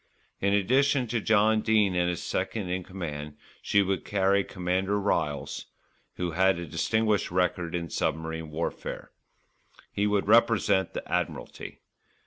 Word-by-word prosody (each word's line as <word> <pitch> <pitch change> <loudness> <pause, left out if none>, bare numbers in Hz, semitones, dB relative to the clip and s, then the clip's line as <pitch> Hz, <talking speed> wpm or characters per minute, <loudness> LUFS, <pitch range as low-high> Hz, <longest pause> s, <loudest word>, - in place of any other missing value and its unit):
In 100 - +1
addition 130 +6 +3
to 115 -1 0
John 110 +1 +3
Dene 105 -4 +2
and 90 0 +2
his 85 - -3
second 105 -5 -2
in 90 0 -2
command, 75 -6 -6 0.2
she 100 - +3
would 95 -2 -1
carry 100 0 +2
Commander 95 +2 -1
Ryles, 75 -8 -1 0.5
who 90 -1 -2
had 95 +2 +3
a 85 - -5
distinguished 105 +6 0
record 90 -1 0
in 85 -1 -4
submarine 80 0 -2
warfare. 80 +2 -5 0.8
He 105 +1 0
would 105 -1 +1
represent 105 -4 +3
the - - -5
Admiralty. - - -4
95 Hz, 135 wpm, -27 LUFS, 85-105 Hz, 0.8 s, addition